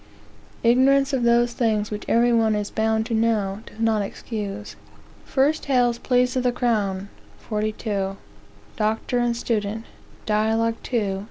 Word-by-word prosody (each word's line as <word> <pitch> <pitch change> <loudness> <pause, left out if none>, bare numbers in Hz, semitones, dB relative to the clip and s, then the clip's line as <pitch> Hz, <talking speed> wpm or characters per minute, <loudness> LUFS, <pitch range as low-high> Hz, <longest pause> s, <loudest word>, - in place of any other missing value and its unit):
(Ignorance 270 +4 +4
of 265 - +1
those 235 0 +3
things 215 -4 0
which 210 0 -5
every 240 +1 +3
one 225 -2 +3
is 210 -1 -3
bound 220 0 +1
to 230 - -4
know, 220 -3 +1
does - - -14
not 225 -2 +2
excuse.) 205 0 -5 0.6
1 275 +3 +3
Hale's 245 -3 +2
Pleas 250 0 +1
of 255 - +2
the 250 0 +2
Crown, 205 -6 -1 0.3
42. 210 -2 -3 0.6
Doctor 220 +3 0
and 240 -1 0
Student, 220 -1 -2 0.4
Dialog. 220 +2 +1
2, - - -10
ch. 205 -6 0
225 Hz, 145 wpm, -23 LUFS, 210-240 Hz, 0.6 s, Ignorance